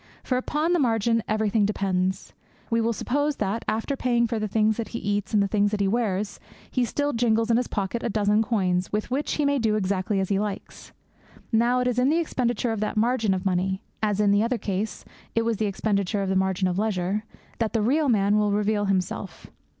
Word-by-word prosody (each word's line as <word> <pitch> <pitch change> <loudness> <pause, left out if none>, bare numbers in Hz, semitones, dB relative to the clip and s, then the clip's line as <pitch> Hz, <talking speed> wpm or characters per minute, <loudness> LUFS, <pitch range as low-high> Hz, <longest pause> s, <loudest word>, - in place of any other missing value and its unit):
For 255 - -1
upon 305 +6 0
the 350 - +3
margin 230 -3 +2
everything 215 0 +1
depends. 190 -2 -1 0.4
We 230 0 +2
will 230 +1 +1
suppose 290 +6 -1
that, 210 +1 -2
after 225 +6 -1
paying 240 -2 +1
for 230 -1 -2
the 215 - -1
things 215 +1 +2
that 230 - -3
he 235 - -5
eats 205 -2 -2
and 210 -2 +3
the - - 0
things 205 0 +2
that 210 0 -2
he 200 - +2
wears, 205 -2 -1 0.3
he 250 -2 +1
still 290 +5 -1
jingles 230 -1 +2
in 230 - +4
his 245 - 0
pocket 200 +3 -2
a - - -2
dozen 210 0 +2
coins, 185 -5 0
with 210 +3 -2
which 280 +3 -1
he 295 - 0
may 280 -1 +2
do 220 -2 +1
exactly 195 0 0
as 190 - -1
he 200 -1 +1
likes. 205 -1 -5 0.6
Now 240 +2 +3
it 250 - 0
is 250 0 +1
in 255 +2 +3
the 315 - +3
expenditure 245 -7 0
of 225 - -2
that 215 0 -2
margin 225 -3 +2
of 185 +1 -5
money 190 +1 0 0.2
as, 210 -2 0
in 205 -1 +4
the 205 +1 +4
other 235 +2 0
case, 205 0 -3 0.3
it 230 0 +2
was 230 -2 0
in 215 - 0
the - - 0
expenditure 200 0 -1
of 195 - -2
that 190 - +1
margin 190 0 +1
of 180 +1 -1
leisure 205 -1 -1 0.4
that 225 -1 -1
the 225 -2 +1
real 285 +5 +2
man 205 -2 +3
will 210 -1 +2
reveal 205 0 +1
himself. 190 0 -3
215 Hz, 225 wpm, -25 LUFS, 200-235 Hz, 0.6 s, in